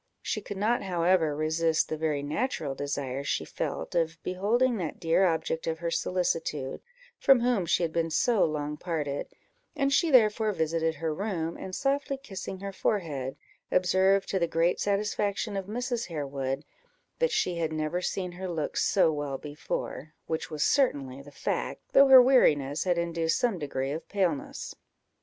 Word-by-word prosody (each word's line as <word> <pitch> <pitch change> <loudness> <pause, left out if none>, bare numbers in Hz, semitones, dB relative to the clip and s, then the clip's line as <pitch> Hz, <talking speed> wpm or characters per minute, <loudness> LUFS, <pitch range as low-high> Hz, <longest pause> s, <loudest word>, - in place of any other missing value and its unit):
She 215 - -2
could 205 0 -7
not, 225 +5 +1
however, 170 -4 +2
resist 160 +1 +1
the - - -2
very 155 -2 -1
natural 150 - -2
desire 140 -1 -3
she - - -1
felt 80 - -4
of 160 -1 0
beholding 225 +7 +1
that 170 -6 -4
dear 175 +2 +3
object 160 -1 -1
of 160 0 -1
her 170 0 -3
solicitude, 165 -8 -1 0.4
from 270 -3 +5
whom 235 -8 +1
she 175 - +2
had 165 -1 -1
been 165 -1 0
so 220 +7 +2
long 150 -1 -2
parted; 150 -5 -3 0.5
and 275 -2 +1
she 335 +3 +3
therefore 220 -4 +4
visited 160 -1 0
her 160 0 -2
room, 170 -3 -3
and, 185 -1 -6
softly 275 0 0
kissing 195 -7 -7
her 200 0 -4
forehead, 150 -11 -2 0.4
observed, 190 +2 +3
to 190 - 0
the 170 - +1
great 165 +2 +1
satisfaction 205 0 -1
of 195 -1 -3
Mrs. 240 +2 -2
Harewood, 140 -3 -3 0.5
that - - +3
she 175 -1 0
had 160 -2 -1
never 155 +3 -2
seen 180 0 -2
her 185 +1 -6
look 160 -4 -3
so 185 -5 +3
well 145 -2 -3
before, 150 +1 -5
which 160 -1 -3
was 150 -1 -1
certainly 140 - +1
the 145 - -13
fact, 145 - -3
though 275 0 +8
her 260 -1 +10
weariness 150 - +3
had 175 -2 +2
induced 170 -1 0
some 230 -7 0
degree 135 -2 -3
of 155 +3 -6
paleness. 180 -8 -2
170 Hz, 165 wpm, -28 LUFS, 155-200 Hz, 0.5 s, her